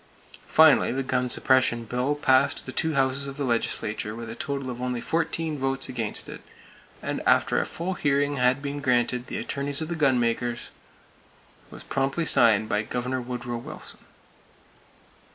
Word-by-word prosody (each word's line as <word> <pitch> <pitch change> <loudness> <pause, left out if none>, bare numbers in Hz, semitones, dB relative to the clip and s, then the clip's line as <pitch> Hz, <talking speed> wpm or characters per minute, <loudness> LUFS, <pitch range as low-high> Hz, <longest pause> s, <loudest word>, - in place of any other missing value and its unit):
Finally, 160 -1 +5
the 135 +2 -2
gun 125 -1 -1
suppression 120 -2 +2
bill 125 +5 -1
passed 130 -3 +2
the 130 - -6
two 160 +3 -1
houses 135 +1 +1
of 135 +1 -7
the 145 - -2
legislature 110 -3 -2
with 115 -1 -7
a - - -7
total 140 -2 -4
of 120 0 -7
only 125 -1 -2
fourteen 160 0 -2
votes 135 0 +1
against 115 -5 -3
it, - - -9 0.6
and - - -3
after - - +3
a - - -1
full 180 +3 -4
hearing 145 -3 0
had 125 +2 +2
been 145 0 -4
granted 125 -2 0
the - - -4
attorneys 140 0 0
of 160 0 -3
the 170 - -2
gunmakers, 120 -4 0 1.0
was - - -9
promptly 135 +5 -1
signed 110 -6 +5
by 105 - 0
Governor 125 +3 -3
Woodrow 120 -1 -5
Wilson. 115 - -7
130 Hz, 160 wpm, -25 LUFS, 120-140 Hz, 1.0 s, Finally